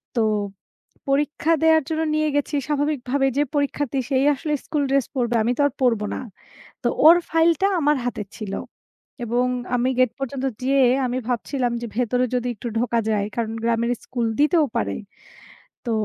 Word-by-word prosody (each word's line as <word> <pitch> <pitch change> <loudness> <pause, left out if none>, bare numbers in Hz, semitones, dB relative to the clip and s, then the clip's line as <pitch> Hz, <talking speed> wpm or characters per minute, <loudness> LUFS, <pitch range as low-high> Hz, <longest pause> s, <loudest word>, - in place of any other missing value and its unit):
তো 230 - +2 0.9
পরীক্ষা 295 +3 +1
দেওয়ার 320 -1 +5
জন্য 320 0 -1
নিয়ে 310 0 +1
গেছি 290 +1 0
স্বাভাবিকভাবে 285 -2 0
যে, - - +4
পরীক্ষার্থী 285 -1 0
সে 275 - 0 0.2
আসলে 300 +2 -3
স্কুল 295 -2 -1
ড্রেস 275 -2 +2
পড়বে। 240 -2 0
আমি 235 - +1
তো - - +1
আর 285 - -5
পড়ব 235 -4 +3
না। - - -4 0.6
তো - - +2 0.2
ওর 330 - +10
ফাইলটা 330 +3 +3
আমার 295 -1 +3
হাতে 240 -3 -2
ছিল। 210 -3 -5 0.7
এবং 240 +2 +1 0.3
আমি 250 +1 +1
গেট 255 -3 +4
পর্যন্ত 270 0 -3 0.2
যেয়ে 270 +1 +3 0.2
আমি 250 0 -1
ভাবছিলাম 245 +1 -1
যে 240 - -4
ভেতরে 250 +1 +1
যদি 245 0 -1
একটু 230 - -7
ঢোকা 235 0 +1
যায়। 210 -2 +1
কারণ 230 -2 -2
গ্রামের 235 +1 +1
স্কুল 240 -2 -2
দিতেও 305 +1 +4
পারে। 100 -1 -1 0.9
তো 235 - -1
260 Hz, 165 wpm, -23 LUFS, 240-295 Hz, 0.9 s, ওর